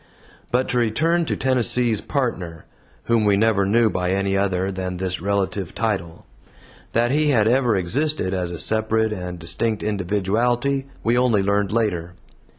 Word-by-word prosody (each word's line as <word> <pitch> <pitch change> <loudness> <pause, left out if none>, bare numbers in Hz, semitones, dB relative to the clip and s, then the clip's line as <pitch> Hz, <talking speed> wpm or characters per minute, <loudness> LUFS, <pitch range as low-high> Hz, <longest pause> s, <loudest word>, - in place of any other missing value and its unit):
But 125 +2 +1
to 125 - +1
return 160 +10 +1
to - - -1
Tennessee's 125 -3 +1
Partner, 95 - -3 0.4
whom 115 -2 +2
we 100 -1 +3
never 105 -2 +2
knew 115 +3 +3
by 90 -3 -1
any 100 0 0
other 95 -1 0
than 95 -1 -4
this 90 -1 -3
relative 100 -2 -2
title; 95 -7 -3 0.7
that 120 +2 +2
he 150 +1 +2
had 110 -6 +3
ever 120 -2 +3
existed 100 - -1
as 90 -2 -2
a 85 - -6
separate 110 +2 +1
and 90 -2 -6
distinct 100 +7 -2
individuality 110 +7 0 0.2
we 115 +1 +2
only 115 -6 +2
learned 100 0 +1
later. 90 -6 -1
105 Hz, 155 wpm, -22 LUFS, 95-120 Hz, 0.7 s, we